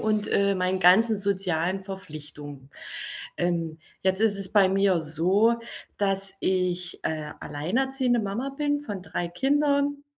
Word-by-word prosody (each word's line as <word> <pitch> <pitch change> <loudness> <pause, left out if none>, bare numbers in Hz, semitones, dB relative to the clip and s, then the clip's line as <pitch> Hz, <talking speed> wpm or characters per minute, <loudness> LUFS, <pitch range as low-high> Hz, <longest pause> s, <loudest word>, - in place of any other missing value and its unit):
und, 215 -1 0
äh, 200 0 +3
meinen 185 0 0
ganzen 210 +5 +5
sozialen 190 -2 0
Verpflichtungen. 150 -7 -9 0.7
Ähm, 170 -2 -1 0.2
jetzt 190 +1 +1
ist 215 -3 +2
es 195 -1 -3
bei 200 -3 +6
mir 195 -2 +3
so, 185 +9 +2 0.4
dass 195 -1 0
ich, 180 -1 -1
äh, 155 -1 -3
alleinerziehende 245 - 0
Mama 220 +6 -3
bin 290 0 0
von 205 -9 -6
3 175 -2 -3
Kindern. 285 +6 +1
195 Hz, 130 wpm, -26 LUFS, 175-220 Hz, 0.7 s, bei